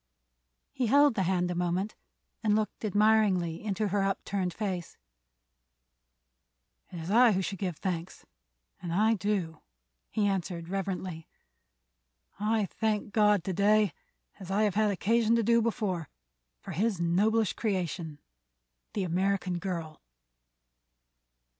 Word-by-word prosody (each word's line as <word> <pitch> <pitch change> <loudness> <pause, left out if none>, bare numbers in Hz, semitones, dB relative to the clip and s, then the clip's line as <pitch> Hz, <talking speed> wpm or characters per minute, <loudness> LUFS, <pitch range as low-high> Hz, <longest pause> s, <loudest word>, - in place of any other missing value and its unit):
He 255 -2 -1
held 285 +3 +5
the 200 - -1
hand 180 -1 +1
a - - -1
moment 180 +4 -1 0.5
and 215 -2 +2
looked 215 +1 -2
admiringly 205 -5 +2
into 210 0 -1
her 200 +1 +1
upturned 195 -1 -1
face. 185 -3 -4 1.9
"It 175 - -9
is 165 +4 -5
I 235 0 +6
who 190 0 0
should 195 0 -4
give 180 -5 -3
thanks, 180 -2 -4 0.6
and 175 -2 -5
I 215 +6 +3
do," 190 -5 -2 0.5
he 210 - 0
answered 175 -3 -2
reverently. 185 -4 -4 1.1
"I 215 0 +1
thank 210 0 -2
God 210 -4 +4
to 190 - -2
day, 205 0 +3 0.5
as 190 -2 -9
I 200 +3 +2
have 210 -3 +2
had 215 0 +2
occasion 225 +3 +2
to 230 - +2
do 230 +2 +4
before, 205 - -2 0.5
for - - -8
his 205 -1 0
noblest 205 +6 +2
creation—the 145 - -5
American 185 0 0
girl." 170 -5 -5
195 Hz, 125 wpm, -29 LUFS, 175-215 Hz, 1.9 s, I